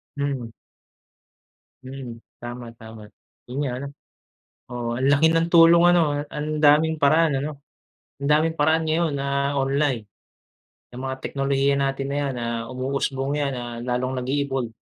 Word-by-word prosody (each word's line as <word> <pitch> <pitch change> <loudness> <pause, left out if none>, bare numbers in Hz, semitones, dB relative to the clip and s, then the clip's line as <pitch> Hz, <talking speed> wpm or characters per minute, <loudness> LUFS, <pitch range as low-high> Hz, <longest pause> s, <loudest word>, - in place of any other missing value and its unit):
Mhm. 135 -5 -3 1.3
Mhm. 130 -3 -8 0.2
Tama, 120 -1 -7
tama. 110 -1 -11 0.4
Yun 130 - -6
nga 130 - -2
ano. 140 - -5 0.8
Oo, 120 -1 -4
ang 130 - 0
laki 155 +3 +4
ng 165 +1 +1
tulong 170 0 +6
ano? 175 - +5 0.3
Ang 150 +1 -4
daming 155 +2 +4
paraan 150 0 +3
ano? 145 -1 -6 0.6
Ang 140 - -2
daming 155 +2 +3
paraan 160 +2 +3
ngayon 160 -1 +1
na 140 0 -1
online. 135 -4 0 0.9
Yang 125 +1 -9
mga 130 0 -3
teknolohiya 140 0 0
natin 135 0 -1
na 140 - -2
yan, 140 -2 -1
ah, 115 -1 -2
umuusbong 135 +2 -2
yan. 140 -2 -1
Ah, 120 -1 -6
lalong 125 +1 -2
nag-e-evolve, 135 -3 -2
140 Hz, 140 wpm, -23 LUFS, 130-150 Hz, 1.3 s, tulong